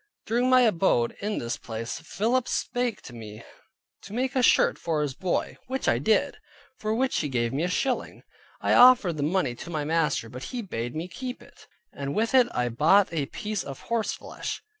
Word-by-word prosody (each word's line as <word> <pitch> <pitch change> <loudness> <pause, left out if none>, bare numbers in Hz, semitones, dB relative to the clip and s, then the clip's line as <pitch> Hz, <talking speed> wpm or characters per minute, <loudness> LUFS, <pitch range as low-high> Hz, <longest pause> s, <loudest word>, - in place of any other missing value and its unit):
During 240 +3 +1
my 255 0 +6
abode 175 - +2
in 210 +1 -2
this 120 +1 -3
place, 115 0 -5
Philip 230 +9 0
spake 245 -4 -2
to 120 - -10
me 110 -1 -9 0.6
to 200 - -11
make 255 +3 -1
a 260 - +3
shirt - - +4
for 160 -3 -1
his 145 -3 -2
boy, 180 +6 -2
which 265 +1 -3
I 115 - +3
did, 215 - +1 0.4
for 215 0 -1
which 260 +2 +1
he 150 - -2
gave 120 -2 -1
me 140 - -1
a 175 - +1
shilling. 255 +7 -2 0.4
I - - +2
offered 245 -10 +7
the - - -2
money 150 -3 +1
to 120 - -9
my 155 -3 -2
master, 155 -6 0
but 125 +3 -8
he 245 -2 -5
bade 120 - -4
me 165 +3 -3
keep 250 +7 -7
it; - - -19 0.3
and 140 0 -4
with 225 +3 0
it 255 -2 +6
I 125 0 0
bought 165 - +4
a 145 -4 -1
piece 210 - -4
of 135 -1 -8
horse 225 -2 0
flesh. - - -6
175 Hz, 205 wpm, -26 LUFS, -, 0.6 s, offered